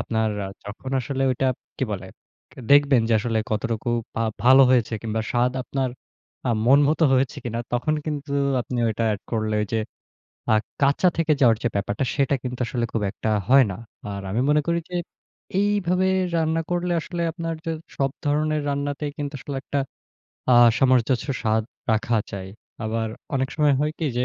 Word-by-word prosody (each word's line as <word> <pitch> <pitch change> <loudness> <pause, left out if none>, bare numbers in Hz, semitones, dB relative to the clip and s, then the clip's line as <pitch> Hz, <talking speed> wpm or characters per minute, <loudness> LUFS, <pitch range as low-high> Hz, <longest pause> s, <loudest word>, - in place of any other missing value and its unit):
আপনার 110 -1 0 0.2
আ - - -6 0.2
যখন 110 +6 -7
আসলে 135 +2 -2
ওইটা 130 +1 0 0.3
কি 130 - +1
বলে? 95 -1 -5 0.4
কে - - -19
দেখবেন 140 -3 +6
যে 115 - +2
আসলে 115 -2 0
কতটুকু 115 +2 -2 0.3
বা 115 - -1 0.2
ভালো 130 +2 +8
হয়েছে 120 -3 +3
কিংবা 110 0 -2
স্বাদ 125 +1 +2
আপনার 130 -1 -2 0.6
আ - - +3 0.2
মন 135 +3 +7
মত 155 - 0
হয়েছে 130 0 +2
কিনা? 115 -1 -2
তখন 125 +6 +1
কিন্তু 145 -2 -4 0.3
আপনি 125 0 -4
ওইটা 110 +1 -1
এড 100 - -4
করলে 110 -1 0
ওইযে 110 +2 -1 0.7
আ - - +6 0.3
কাঁচা 140 +6 +4
থেকে 160 -2 +3
যাওয়ার 115 -4 +5
যে 120 - +3
ব্যাপারটা, 100 +4 -1
সেটা 140 -1 +2
কিন্তু 125 0 -4
আসলে 120 -2 -1
খুব 115 - 0
একটা 110 - -3 0.2
হয় 135 0 +7
না। 90 - -6 0.3
আর 100 0 -5
আমি 115 - +1
মনে 150 0 +4
করি 170 0 +2
যে 180 - -5 0.6
এইভাবে 190 -3 +2 0.3
রান্না 165 0 +1
করলে 175 0 0
আসলে 170 +2 -5
আপনার 165 -1 -4
যা 165 - -1 0.3
সব 135 -1 +1
ধরনের 150 +1 +1
রান্নাতেই 145 +1 -2
কিন্তু 145 0 -4
আসলে 140 +1 -6
একটা 140 - -1 0.7
আ - - +7 0.2
সামঞ্জস্য 130 0 +2
স্বাদ 110 0 +2 0.3
রাখা 115 +1 +1 0.2
যায়। 95 -1 -6 0.3
আবার 110 0 -1 0.3
অনেক 130 0 0
সময় 150 -2 +3
হয় 150 +1 0
কি? 160 - -1
যে 125 - +2
130 Hz, 175 wpm, -24 LUFS, 115-150 Hz, 0.7 s, ভালো